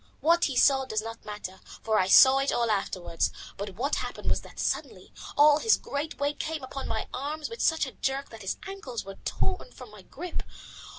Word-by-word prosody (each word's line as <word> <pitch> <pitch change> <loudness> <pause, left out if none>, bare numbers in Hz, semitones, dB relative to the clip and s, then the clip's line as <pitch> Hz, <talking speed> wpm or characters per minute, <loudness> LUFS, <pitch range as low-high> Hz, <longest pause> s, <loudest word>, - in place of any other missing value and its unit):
What 340 +2 +4
he 270 - -2
saw 270 0 +5
does 215 -4 -2
not 225 0 -8
matter, 205 -3 -7 0.2
for 220 -1 +2
I 185 - +2
saw 265 +7 +8
it 275 - +1
all 235 -2 +1
afterwards, 185 -4 -1 0.2
but 200 -1 -6
what 270 +8 0
happened - - -3
was - - +1
that - - -15
suddenly - - -3 0.2
all 295 0 +7
his 450 - +4
great 290 +2 -4
weight 285 +1 -1
came 315 -3 -3
upon 265 +1 -5
my 220 - -2
arms 295 +3 -3
with 460 - -6
such 320 -2 +3
a 260 - -7
jerk 270 +2 -2
that 225 -1 -10
his 195 - -3
ankles 275 - -6
were 195 0 -9
torn - - -1
from 250 -4 -12
my 210 -2 -12
grip. 340 - -6
265 Hz, 210 wpm, -28 LUFS, 215-295 Hz, 0.2 s, saw